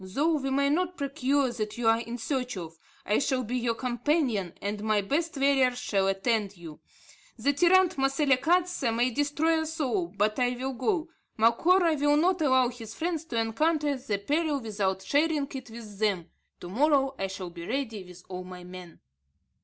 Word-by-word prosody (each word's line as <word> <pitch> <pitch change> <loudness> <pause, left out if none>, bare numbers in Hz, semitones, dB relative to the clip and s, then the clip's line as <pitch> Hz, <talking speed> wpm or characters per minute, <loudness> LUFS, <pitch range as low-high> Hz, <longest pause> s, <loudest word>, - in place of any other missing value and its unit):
Though 290 - +1
we 270 -1 -3
may 280 +1 +2
not 360 +3 0
procure 275 -2 0
what 215 -1 -4
you 240 -2 -1
are 225 0 +5
in 235 +1 -5
search 250 -1 -3
of, 165 -2 -8 0.3
I 210 - +2
shall 260 -2 0
be 245 +2 -4
your 235 -2 0
companion, 245 - 0
and 205 +1 -4
my 215 -1 +2
best 305 - -1
warriors 270 -2 +3
shall 195 -5 0
attend 200 0 0
you. 165 -3 -10 0.6
The 285 - +1
tyrant 360 +3 +4
Moselekatse 275 +2 +2
may 245 +2 +2
destroy 295 +4 +1
us 320 +1 -5
all, 315 +5 0
but 215 -6 -1
I 250 0 +1
will 265 +2 -3
go. 335 - -1 0.3
Macora 325 +11 +4
will 290 +1 +3
not 350 +2 +2
allow 260 -4 +4
his 230 -3 -9
friends 330 -1 -2
to 240 -7 -4
encounter 290 +6 +1
the 250 -6 -3
peril 295 +7 0
without 200 -5 -2
sharing 295 +4 +1
it 260 -3 -7
with 220 -3 -10
them. 195 -6 0 0.3
To 175 - -7
morrow 275 - +2
I 195 - -1
shall 190 -2 -7
be 170 0 -9
ready 225 -5 -3
with 180 0 -14
all 185 -1 -6
my 180 0 -10
men." 180 -2 -11
255 Hz, 180 wpm, -28 LUFS, 210-295 Hz, 0.6 s, are